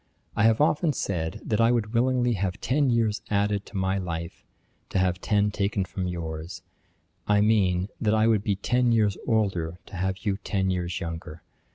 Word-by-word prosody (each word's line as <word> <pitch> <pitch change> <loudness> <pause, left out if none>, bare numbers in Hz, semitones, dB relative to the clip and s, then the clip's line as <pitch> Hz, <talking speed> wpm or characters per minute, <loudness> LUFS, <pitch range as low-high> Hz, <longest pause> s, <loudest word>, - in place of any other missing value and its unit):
I 105 - +3
have 115 -1 +4
often 150 +1 +2
said, 80 -9 -3
that 110 +1 +1
I 115 +1 +5
would 115 -2 0
willingly 125 0 +2
have 95 -2 -2
ten 140 +2 +1
years 115 -3 +1
added 100 0 0
to - - -7
my 95 +1 0
life, 85 -2 -5 0.5
to - - -2
have 90 -1 +1
ten 105 0 +2
taken 100 -1 -1
from 95 +1 -4
yours; 80 0 -5 0.6
I 105 0 +4
mean, 95 -4 +2
that 110 -1 +2
I 110 0 +3
would 110 -3 +3
be 105 -2 +1
ten 125 +5 +1
years 105 -4 +3
older 95 -7 0
to 100 - -11
have 95 +4 -2
you 100 -2 +1
ten 95 -2 -1
years 90 -1 -2
younger. 85 -2 -6
100 Hz, 185 wpm, -26 LUFS, 90-110 Hz, 0.6 s, I